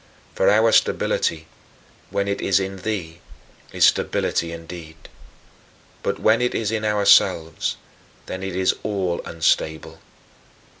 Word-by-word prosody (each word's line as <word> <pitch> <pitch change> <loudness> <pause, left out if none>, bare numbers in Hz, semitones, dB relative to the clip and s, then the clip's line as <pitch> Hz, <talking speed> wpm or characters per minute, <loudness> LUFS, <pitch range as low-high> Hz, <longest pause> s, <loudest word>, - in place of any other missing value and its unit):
For - - +2
our 110 +2 +4
stability, 80 -6 +1 0.6
when 100 0 -1
it 100 - -2
is 100 0 +2
in 95 0 -4
thee, 90 -5 -4 0.5
is - - +4
stability 85 0 +1
indeed; 85 -1 -9 1.0
but - - -2
when 110 +2 +3
it 125 - 0
is 110 -2 -1
in 110 -1 -2
ourselves, 100 -6 +2 0.5
then 95 - -6
it 95 -1 -5
is 95 0 +2
all 95 -5 -2
unstable. 80 -1 -1
95 Hz, 120 wpm, -22 LUFS, 85-105 Hz, 1.0 s, our